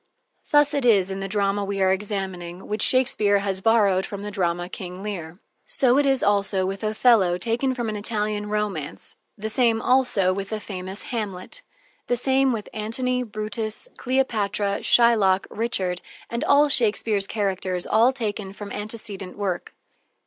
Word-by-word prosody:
Thus 295 0 +4
it 285 -2 0
is 200 -6 +4
in 190 - -4
the 195 - -3
drama 200 0 0
we 200 0 -3
are 190 0 +4
examining, 190 -3 -5
which 210 +1 -2
Shakespeare 230 -6 +3
has 195 -1 -2
borrowed 200 -4 +3
from 200 0 -6
the 210 - -5
drama 175 -3 -1
"King 185 0 -8
Leir." 175 -5 -6 0.3
So 260 0 +3
it 290 - +2
is 270 -1 +2
also 200 -2 +2
with 195 +3 -4
Othello, 215 -4 +3
taken 235 +7 0
from 240 -2 -3
an 215 - -3
Italian 210 0 -1
romance, 200 -8 -3 0.2
the 215 +1 -4
same 225 0 +3
also 225 -7 +3
with 195 +1 -5
the 220 - -3
famous 190 -1 -5
Hamlet. 210 - -3 0.5
The 245 - +2
same 265 +2 +2
with 220 -4 -4
Antony, 250 +4 -1
Brutus, 215 - -4
Cleopatra, 210 -6 0
Shylock, 215 -6 +4
Richard, 190 -6 -1 0.3
and 235 +4 -2
all 290 -1 +5
Shakespeare's 215 -5 +2
characters, 190 -3 -2
all 230 +4 +4
taken 210 -6 -4
from 205 0 -8
some - - -4
antecedent 210 -3 -6
work. 190 -4 -3
210 Hz, 160 wpm, -24 LUFS, 195-230 Hz, 0.5 s, all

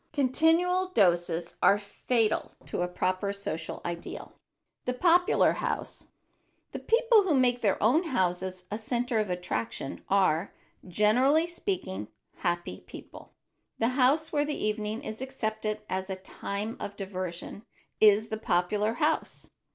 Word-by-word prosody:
Continual 325 +7 +3
doses 175 - +1
are 200 - +6
fatal 215 +2 -1
to - - -3
a 180 - +1
proper 185 +2 -1
social 180 -5 -5
ideal. 170 0 -6
[Sidenote: - - -32 0.5
THE 250 - 0
POPULAR 350 +5 +4
HOUSE] - - -4 0.6
The - - -5
people 460 -1 +4
who 365 -7 +1
make 250 -2 +3
their 200 -4 +2
own 290 - +4
houses 185 - -1
a 210 - -2
center 240 +1 -1
of 210 -3 -1
attraction 135 -8 -4
are, 190 -2 +2 0.3
generally 250 - +3
speaking, 345 - -4 0.3
happy 175 - -2
people. - - -12 0.4
The 230 - +2
house 275 +5 +2
where 290 -1 +2
the 295 0 -3
evening 215 +3 -2
is 220 -2 -6
accepted 220 -5 -3
as 190 +1 -3
a 190 - -2
time 200 +3 -5
of 200 - -6
diversion 185 0 -5 0.4
is 215 +1 +5
the 220 - -2
popular 210 +3 +1
house. 300 +5 -1
215 Hz, 135 wpm, -28 LUFS, 185-265 Hz, 0.6 s, are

